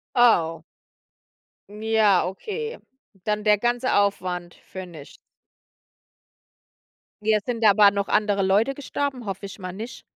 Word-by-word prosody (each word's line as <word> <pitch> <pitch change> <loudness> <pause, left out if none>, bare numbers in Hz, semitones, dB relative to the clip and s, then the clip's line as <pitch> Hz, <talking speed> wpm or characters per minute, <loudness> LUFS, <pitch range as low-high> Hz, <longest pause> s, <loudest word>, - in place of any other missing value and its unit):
Oh. 165 -10 +3 1.1
Ja, 215 -2 +2
okay. 445 - -5 0.5
Dann 210 0 -1
der 210 -1 +5
ganze 240 +3 0
Aufwand 180 -3 -1
für 190 0 -7
nichts. 160 -5 -13 2.0
Ja, 215 0 +3
sind 230 +1 -3
aber 205 -1 +7
noch 200 0 -2
andere 205 -1 +1
Leute 205 +8 +2
gestorben? 280 -2 -4
Hoffe 195 0 -5
ich 195 +1 -10
mal 185 -2 -6
nicht. 225 +7 -8
210 Hz, 120 wpm, -24 LUFS, 190-235 Hz, 2.0 s, aber